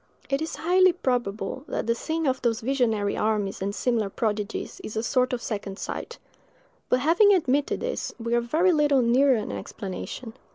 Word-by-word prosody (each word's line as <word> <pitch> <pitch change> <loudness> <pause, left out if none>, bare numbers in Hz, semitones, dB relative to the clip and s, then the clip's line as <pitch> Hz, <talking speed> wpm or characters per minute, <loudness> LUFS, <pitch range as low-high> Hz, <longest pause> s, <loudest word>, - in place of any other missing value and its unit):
It 275 +2 +1
is 320 - -3
highly 370 +2 +4
probable 245 - -2
that - - -2
the 230 - +2
seeing 320 +7 -2
of 260 -2 0
those 230 -2 0
visionary 225 -5 +1
armies 210 -3 -1
and 200 +1 -2
similar 230 -5 0
prodigies 210 0 -3
is 215 - -7
a 220 - -1
sort 255 +1 +1
of 245 -1 -3
second 200 -3 -4
sight; - - -5 0.7
but 255 - +3
having 370 +8 +5
admitted 285 -5 0
this, - - -3
we 230 0 -2
are 240 - +3
very 320 +10 +2
little 295 -5 +3
nearer 260 +3 +4
an 215 -2 -3
explanation. 220 +3 -6
245 Hz, 175 wpm, -26 LUFS, 220-290 Hz, 0.7 s, having